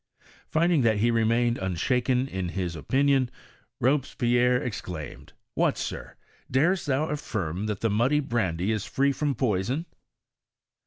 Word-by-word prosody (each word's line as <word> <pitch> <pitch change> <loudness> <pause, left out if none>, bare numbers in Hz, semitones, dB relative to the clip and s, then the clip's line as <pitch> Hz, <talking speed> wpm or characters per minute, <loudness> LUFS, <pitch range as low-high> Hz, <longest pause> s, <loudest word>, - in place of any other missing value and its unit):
Finding 170 -1 +2
that 110 -3 +3
he 115 +3 +2
remained 115 +1 +2
unshaken 125 +8 0
in 95 -6 -3
his 90 -2 -3
opinion, 135 - +2 0.5
Robespierre 125 -2 +2
ex 120 -7 -3
claimed, 80 -5 -8
*' - - -58
What, - - +1
Sir! - - -5 0.3
darest 165 +8 +2
thou 145 +3 +1
affirm 105 - -3
that 105 -2 -3
the 115 - +1
muddy 125 +8 +2
brandy 105 - -1
is 105 -2 -1
free 140 +1 +1
from 145 0 -1
poison?" 120 - 0
120 Hz, 140 wpm, -26 LUFS, 100-135 Hz, 0.5 s, that